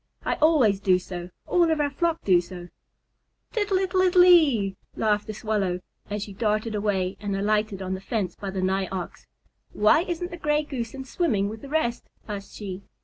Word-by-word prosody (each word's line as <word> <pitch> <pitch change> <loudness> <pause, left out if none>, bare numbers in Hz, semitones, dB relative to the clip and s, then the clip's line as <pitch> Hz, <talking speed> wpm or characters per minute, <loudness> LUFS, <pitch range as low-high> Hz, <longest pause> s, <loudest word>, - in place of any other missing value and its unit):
"I - - +1
always 270 -11 +4
do 190 -2 +3
so. 180 -1 -7 0.2
All 345 -2 +3
of 320 -1 +1
our 290 -1 +1
flock 330 +3 -1
do 180 -3 +4
so." 175 0 -10 0.8
"Tittle 410 -4 +1
ittle 375 0 +1
ittle 365 -1 +6
ee," 275 - +5 0.2
laughed 210 -1 +1
the 215 - -4
Swallow, 200 -5 -1 0.3
as 205 0 -3
she 205 - -8
darted 215 +2 0
away 200 -3 -1
and 200 -1 -3
alighted 210 -1 0
on 185 0 -3
the 190 - -5
fence 195 -4 -2
by 200 - -6
the 190 -1 -3
Nigh 190 0 +1
Ox. 185 -2 -6 0.5
"Why 215 +9 +4
isn't 350 0 -3
the 345 - -6
Gray 300 -1 +1
Goose 255 -5 -5
in 265 -1 -7
swimming 230 - 0
with 220 +1 -8
the 280 - -9
rest?" 280 -6 -1 0.2
asked 200 -2 -7
she. 195 -2 -6
215 Hz, 195 wpm, -25 LUFS, 195-300 Hz, 0.8 s, ittle